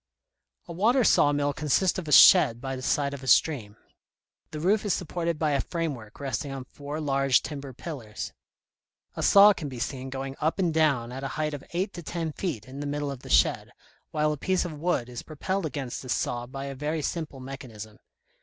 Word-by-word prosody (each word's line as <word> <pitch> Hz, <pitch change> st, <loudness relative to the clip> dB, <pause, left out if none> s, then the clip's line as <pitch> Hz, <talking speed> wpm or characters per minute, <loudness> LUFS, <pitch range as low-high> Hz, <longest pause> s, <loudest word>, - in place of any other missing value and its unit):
A 170 Hz, -, -7 dB
water 235 Hz, +9 st, +3 dB
saw 145 Hz, -8 st, +5 dB
mill 145 Hz, 0 st, 0 dB
consists 155 Hz, +6 st, +1 dB
of 170 Hz, -, -7 dB
a -, -, -4 dB
shed 115 Hz, -3 st, +8 dB
by 135 Hz, +1 st, -4 dB
the 130 Hz, -, -7 dB
side 140 Hz, +1 st, 0 dB
of 140 Hz, -, -7 dB
a 130 Hz, -, -9 dB
stream. 115 Hz, -6 st, +2 dB, 0.7 s
The 155 Hz, -, -6 dB
roof 200 Hz, +6 st, +2 dB
is 205 Hz, -4 st, +1 dB
supported 170 Hz, -1 st, -2 dB
by 155 Hz, -1 st, +1 dB
a 140 Hz, -2 st, +2 dB
framework 140 Hz, -11 st, -5 dB
resting 140 Hz, +1 st, -3 dB
on 135 Hz, -1 st, -5 dB
four 145 Hz, +3 st, -7 dB
large 135 Hz, -3 st, +2 dB
timber 140 Hz, -1 st, -6 dB
pillars. 125 Hz, -6 st, -7 dB, 0.8 s
A -, -, -4 dB
saw 205 Hz, +1 st, +8 dB
can 150 Hz, -6 st, -6 dB
be 130 Hz, -, -8 dB
seen 130 Hz, +2 st, -4 dB
going 135 Hz, 0 st, -5 dB
up 160 Hz, +2 st, +1 dB
and 175 Hz, -4 st, +1 dB
down 140 Hz, -7 st, +2 dB
at 130 Hz, +2 st, -6 dB
a -, -, -1 dB
height 155 Hz, -1 st, -1 dB
of 145 Hz, -, -6 dB
eight 185 Hz, +4 st, -2 dB
to 175 Hz, -, -7 dB
ten 165 Hz, 0 st, -3 dB
feet 145 Hz, -, -4 dB
in 135 Hz, +2 st, -9 dB
the 145 Hz, -, -4 dB
middle 145 Hz, 0 st, -2 dB
of 135 Hz, -, -7 dB
the -, -, -12 dB
shed, -, -, +3 dB, 0.4 s
while 150 Hz, 0 st, +1 dB
a 150 Hz, -, -3 dB
piece 185 Hz, +5 st, 0 dB
of 170 Hz, -, -5 dB
wood 150 Hz, -5 st, -1 dB
is 120 Hz, -1 st, -7 dB
propelled 180 Hz, +4 st, -3 dB
against 135 Hz, -4 st, -5 dB
this 130 Hz, -, -2 dB
saw 120 Hz, 0 st, -2 dB
by 135 Hz, +2 st, -6 dB
a 140 Hz, -, -5 dB
very 150 Hz, +3 st, -3 dB
simple 155 Hz, -5 st, -4 dB
mechanism. 115 Hz, -5 st, -9 dB
145 Hz, 210 wpm, -27 LUFS, 130-160 Hz, 0.8 s, shed